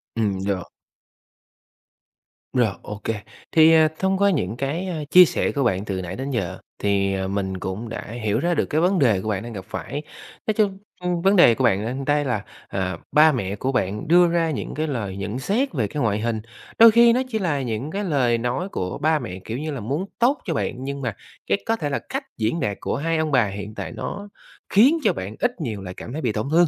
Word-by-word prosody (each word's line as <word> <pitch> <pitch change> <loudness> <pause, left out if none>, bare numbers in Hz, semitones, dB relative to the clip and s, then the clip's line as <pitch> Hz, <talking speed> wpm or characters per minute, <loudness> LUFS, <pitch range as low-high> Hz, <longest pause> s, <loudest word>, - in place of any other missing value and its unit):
Ừm, 100 -4 -1
được. 95 -3 -1 1.9
Rồi, 125 -3 +3 0.2
OK. 105 0 -8 0.5
Thì, 160 0 +7
à, 160 -1 +6
thông 190 0 +1
qua 200 +1 +4
những 120 - -1
cái, 150 +8 -2
a, 160 -4 -3
chia 180 +3 +9
sẻ - - 0
của 140 - 0
bạn 100 -4 0
từ 95 -3 -3
nãy 90 +1 -5
đến 135 +4 -4
giờ 100 -8 -2 0.2
thì, 100 -1 +1
à, 95 0 -2
mình 95 -1 -2
cũng 95 +6 -5
đã 115 - -5 0.2
hiểu 110 0 +1
ra 175 +5 +1
được - - +1
cái 155 +1 0
vấn 185 0 +3
đề 110 -8 +3
của 110 - -4
bạn 100 0 -1
đang 120 - -7
gặp 95 -3 -7
phải. 140 +5 -5 0.5
Nói 215 - +2
chung, 205 -3 +1 0.2
ưm, 180 -1 -1
vấn 195 +3 +4
đề 145 - +7
của 130 - -1
bạn 105 -3 +2
ở 120 - -2
đây 145 +1 +2
là, 115 -6 -1 0.2
à, 95 -2 -2
ba 155 +1 +6
mẹ 100 -7 -2
của 130 +6 -2
bạn 105 -4 -1
đưa 175 +2 +6
ra 165 -1 +1
những 145 - -4
cái 155 +1 -1
lời 105 -9 -3
nhận 105 +5 -4
xét 220 - 0
về 115 -9 0
cái 145 - -4
ngoại 105 -2 +1
hình, 110 0 -1 0.4
đôi 230 0 +10
khi 235 +1 +6
nó 250 - +2
chỉ 225 -4 -2
là 160 -8 0
những 125 +4 -3
cái 200 +3 -2
lời 130 - +2
nói 125 +11 -2
của 90 - -3
ba 155 +1 +2
mẹ, 90 -8 -6
kiểu 115 - -4
như 155 +3 -3
là, 140 - -4
muốn 140 - -2
tốt 260 +5 +3
cho 170 - -1
bạn, 130 -3 -3
nhưng 140 +1 -4
mà 120 -5 -3 0.3
cái - - 0
có 225 - +1
thể 150 -10 -3
là 140 - -1
cách 270 +2 -2
diễn 115 +9 0
đạt 105 -9 -1
của - - -1
hai 165 +3 0
ông 155 -1 0
bà 125 -4 +4
hiện 100 +2 -7
tại - - -5
nó 200 0 -6 0.4
khiến 255 +11 +5
cho 215 - +3
bạn 95 +3 -6
ít 245 -7 -1
nhiều 110 -8 -3
lại 90 -1 -7
cảm 120 - -8
thấy 155 - -3
bị 120 - 0
tổn 105 +4 -2
thương, 170 +2 +5
135 Hz, 240 wpm, -23 LUFS, 105-170 Hz, 1.9 s, đôi